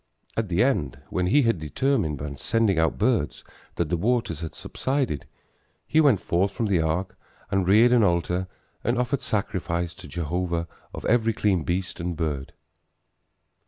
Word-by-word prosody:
At 110 Hz, -3 st, -1 dB
the 85 Hz, +4 st, +3 dB
end, 75 Hz, -, 0 dB
when 90 Hz, -1 st, 0 dB
he 145 Hz, +9 st, +4 dB
had 115 Hz, -7 st, +2 dB
determined 80 Hz, -, 0 dB
by 70 Hz, +1 st, -5 dB
sending 100 Hz, +4 st, +1 dB
out 80 Hz, 0 st, +2 dB
birds 110 Hz, -, +1 dB, 0.3 s
that 85 Hz, -3 st, -1 dB
the 85 Hz, -, +1 dB
waters 110 Hz, -, 0 dB
had 80 Hz, -, -6 dB
subsided, 130 Hz, -, -2 dB, 0.6 s
he 160 Hz, -, +3 dB
went 135 Hz, -, +5 dB
forth 95 Hz, +4 st, +1 dB
from 115 Hz, -, -1 dB
the 95 Hz, -5 st, +2 dB
ark 90 Hz, +4 st, -1 dB, 0.4 s
and 95 Hz, -2 st, +1 dB
reared 115 Hz, +5 st, +6 dB
an 120 Hz, -, +5 dB
altar 90 Hz, -1 st, +1 dB, 0.4 s
and 120 Hz, +1 st, +1 dB
offered 125 Hz, +2 st, 0 dB
sacrifice 85 Hz, -4 st, -2 dB
to 90 Hz, 0 st, -12 dB
Jehovah 85 Hz, 0 st, -2 dB, 0.2 s
of -, -, -7 dB
every 115 Hz, -1 st, +3 dB
clean 100 Hz, -5 st, +1 dB
beast 90 Hz, +4 st, -2 dB
and 85 Hz, -1 st, -3 dB
bird. 75 Hz, -5 st, -3 dB
90 Hz, 160 wpm, -25 LUFS, 85-115 Hz, 0.6 s, reared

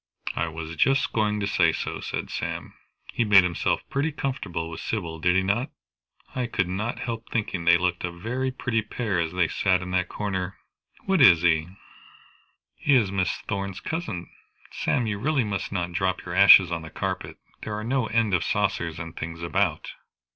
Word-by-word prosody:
"I 85 Hz, -, 0 dB
was 80 Hz, 0 st, -6 dB
just 130 Hz, -, +2 dB
going 105 Hz, -1 st, +1 dB
to -, -, 0 dB
say 90 Hz, -5 st, +3 dB
so," -, -, -4 dB
said -, -, -4 dB
Sam. -, -, -4 dB, 0.4 s
"He -, -, +1 dB
made 100 Hz, -3 st, +7 dB
himself 85 Hz, -2 st, -1 dB
pretty 145 Hz, +4 st, -1 dB
comfortable 110 Hz, -, -3 dB
with 80 Hz, -, -7 dB
Sybil, 85 Hz, -7 st, -4 dB
did 90 Hz, +2 st, +2 dB
he 95 Hz, -, +3 dB
not? 115 Hz, +8 st, 0 dB, 0.6 s
I 125 Hz, -1 st, -2 dB
could 95 Hz, -6 st, 0 dB
not 105 Hz, +6 st, -3 dB
help 115 Hz, -1 st, -5 dB
thinking 100 Hz, -6 st, -2 dB
they 85 Hz, 0 st, +7 dB
looked 90 Hz, 0 st, -1 dB
a 90 Hz, -, -2 dB
very 120 Hz, +10 st, -3 dB
pretty 120 Hz, -3 st, -1 dB
pair 110 Hz, -3 st, -2 dB
as 80 Hz, -1 st, -1 dB
they 90 Hz, -1 st, +2 dB
sat 90 Hz, +3 st, +1 dB
in 90 Hz, -, -6 dB
that 90 Hz, -1 st, 0 dB
corner. 95 Hz, -3 st, -3 dB, 0.5 s
What 190 Hz, -4 st, +2 dB
is 85 Hz, -9 st, +7 dB
he?" 80 Hz, -2 st, +3 dB, 1.1 s
"He 145 Hz, -, +2 dB
is 110 Hz, -7 st, +3 dB
Miss 95 Hz, -2 st, +1 dB, 0.2 s
Thorn's 100 Hz, -1 st, -3 dB
cousin. 135 Hz, -, -4 dB, 0.4 s
Sam, 120 Hz, -, 0 dB
you 105 Hz, -2 st, -2 dB
really 140 Hz, +2 st, +1 dB
must 100 Hz, -3 st, -3 dB
not 90 Hz, -3 st, -2 dB
drop 95 Hz, +1 st, -1 dB
your 85 Hz, -, -5 dB
ashes 95 Hz, -1 st, +8 dB
on 85 Hz, -1 st, -2 dB
the 80 Hz, -, -9 dB
carpet. -, -, -4 dB, 0.2 s
There 105 Hz, -, -4 dB
are 105 Hz, -, -4 dB
no 125 Hz, 0 st, 0 dB
end 115 Hz, -2 st, +1 dB
of 90 Hz, -, +2 dB
saucers 85 Hz, -1 st, -1 dB
and 85 Hz, 0 st, -7 dB
things 85 Hz, +1 st, -6 dB
about." 85 Hz, -, 0 dB
95 Hz, 190 wpm, -25 LUFS, 85-115 Hz, 1.1 s, ashes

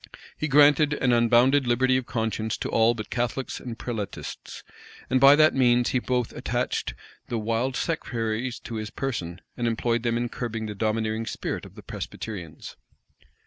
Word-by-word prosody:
He 155 Hz, -, -2 dB
granted 145 Hz, +1 st, +5 dB
an 125 Hz, -4 st, +1 dB
unbounded 120 Hz, +3 st, +4 dB
liberty 130 Hz, +2 st, +3 dB
of 130 Hz, -1 st, -1 dB
conscience 110 Hz, -1 st, -2 dB
to -, -, -4 dB
all 115 Hz, +1 st, +3 dB
but 110 Hz, -2 st, -7 dB
Catholics 120 Hz, +2 st, -2 dB
and 120 Hz, -2 st, -7 dB
Prelatists; 110 Hz, -5 st, -6 dB, 0.5 s
and 130 Hz, 0 st, +3 dB
by 140 Hz, +1 st, +9 dB
that 155 Hz, +1 st, +5 dB
means 120 Hz, -2 st, +3 dB
he 130 Hz, -, +1 dB
both 125 Hz, -1 st, -1 dB
attached -, -, -2 dB, 0.3 s
the 120 Hz, -, -2 dB
wild 115 Hz, +4 st, -1 dB
sectaries 120 Hz, -6 st, -2 dB
to 115 Hz, -, -6 dB
his 110 Hz, -1 st, -4 dB
person, 90 Hz, -11 st, -4 dB
and 120 Hz, -1 st, -1 dB
employed 115 Hz, 0 st, 0 dB
them 115 Hz, 0 st, 0 dB
in 120 Hz, 0 st, -1 dB
curbing 115 Hz, -2 st, -4 dB
the 105 Hz, -, -4 dB
domineering 110 Hz, +1 st, -1 dB
spirit -, -, -4 dB
of -, -, -18 dB
the -, -, -12 dB
Presbyterians. 90 Hz, -8 st, -7 dB
120 Hz, 165 wpm, -26 LUFS, 110-130 Hz, 0.5 s, by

